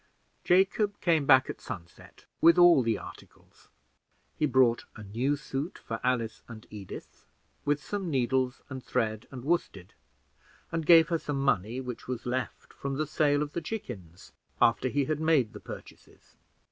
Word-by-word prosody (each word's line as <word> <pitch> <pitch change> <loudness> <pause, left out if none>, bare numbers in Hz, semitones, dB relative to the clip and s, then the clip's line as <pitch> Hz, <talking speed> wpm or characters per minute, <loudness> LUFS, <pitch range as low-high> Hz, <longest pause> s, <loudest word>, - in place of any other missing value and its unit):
Jacob 195 +3 +2
came 160 -5 +2
back 130 -2 +6
at - - -7
sunset, 85 -2 -10 0.2
with 170 +1 +7
all 175 -5 +7
the 115 -3 0
articles. - - -14 0.7
He 150 - +1
brought 125 -3 +3
a 110 - -9
new 120 +8 0
suit 145 +2 -5
for 115 0 -6
Alice 120 -3 -1
and 110 -2 -11
Edith, 100 -3 -10 0.4
with 145 0 0
some 200 -4 -3
needles 130 -2 0
and 130 -2 -7
thread, 110 -1 -2
and 130 -3 -9
worsted, 120 - -2 0.8
and 165 -2 -3
gave 165 -1 +7
her 165 -1 +1
some 145 -2 -3
money 120 -3 0
which 125 -2 -7
was 125 -2 -4
left 125 0 -4
from 140 0 -4
the 155 +3 -1
sale 145 -1 +2
of 150 0 -7
the 170 - -2
chickens, 105 - -7 0.3
after 120 +2 +3
he 140 +1 0
had 155 +1 -1
made 155 -8 +2
the - - -8
purchases. - - -12
135 Hz, 160 wpm, -29 LUFS, 120-155 Hz, 0.8 s, with